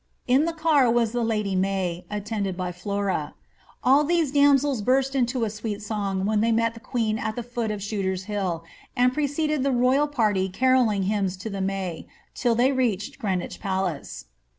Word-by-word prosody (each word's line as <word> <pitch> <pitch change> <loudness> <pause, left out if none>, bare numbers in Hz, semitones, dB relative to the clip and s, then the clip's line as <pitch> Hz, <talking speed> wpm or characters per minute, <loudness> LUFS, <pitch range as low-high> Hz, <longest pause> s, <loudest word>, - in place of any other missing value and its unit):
In 260 +5 +3
the 335 - -1
car 310 -6 +3
was 230 -1 +2
the 240 0 -1
lady 210 -4 0
May, 185 -2 -1
attended 205 -2 -3
by 180 -1 -2
Flora. 190 -3 -2 0.5
All 270 +4 +5
these 325 -2 +1
damsels 280 -3 +3
burst 265 +4 +2
into 250 -2 0
a 220 - 0
sweet 210 -1 -4
song 200 -3 -2
when 210 0 +1
they 230 +1 +2
met 230 0 +2
the 230 - -11
queen 225 -3 -1
at 215 0 -3
the 240 - -4
foot 235 -1 -3
of 210 -2 -4
Shooter's 190 -3 -2
Hill, 185 -5 -2 0.3
and 250 0 +3
preceded 300 +1 0
the 275 +1 +1
royal 255 +4 +3
party 210 -9 +1
carolling 240 -2 +2
hymns 195 -2 -1
to 210 +4 -6
the 195 -1 -3
May, 190 -3 -3 0.3
till 240 -2 +1
they 250 +4 +3
reached 230 -7 -1
Greenwich 190 -4 -2
Palace. 180 - -3
220 Hz, 180 wpm, -25 LUFS, 195-255 Hz, 0.5 s, All